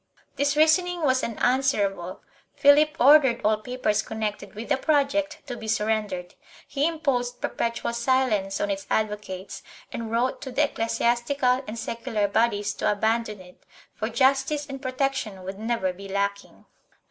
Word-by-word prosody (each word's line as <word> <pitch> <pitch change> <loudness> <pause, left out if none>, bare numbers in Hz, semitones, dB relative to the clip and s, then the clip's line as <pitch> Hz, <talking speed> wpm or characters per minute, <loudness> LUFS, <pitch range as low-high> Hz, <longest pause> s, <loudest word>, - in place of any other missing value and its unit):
This 285 +1 0
reasoning 345 +2 +3
was 260 -2 +3
unanswer 245 -2 +1
able; 185 0 -9 0.3
Philip 290 +1 +5
ordered 270 -3 +6
all 215 0 +3
papers 215 -2 -1
connected 215 -1 -5
with 225 +2 -7
the 275 - +3
project 295 +2 0
to 255 -4 -5
be 225 -2 -8
surrendered; 210 -5 -1 0.3
he 285 +2 0
imposed 265 -7 -1
perpetual 235 0 -2
silence 235 -5 +1
on 205 - 0
its 195 0 -4
advocates 210 -3 -3 0.3
and 230 -1 -4
wrote 240 +3 0
to 265 - -6
the - - +2
ecclesiastical 245 +3 0
and 215 +2 -6
secular 225 -2 -2
bodies 205 -1 +1
to - - 0
abandon 220 0 0
it, 180 0 -17 0.3
for 220 - -3
justice 270 +4 +2
and 270 -2 -8
protection 255 -7 -2
would 190 +2 -7
never 220 -5 -1
be 195 +2 -10
lacking. 200 +1 -3
235 Hz, 145 wpm, -25 LUFS, 210-270 Hz, 0.3 s, ordered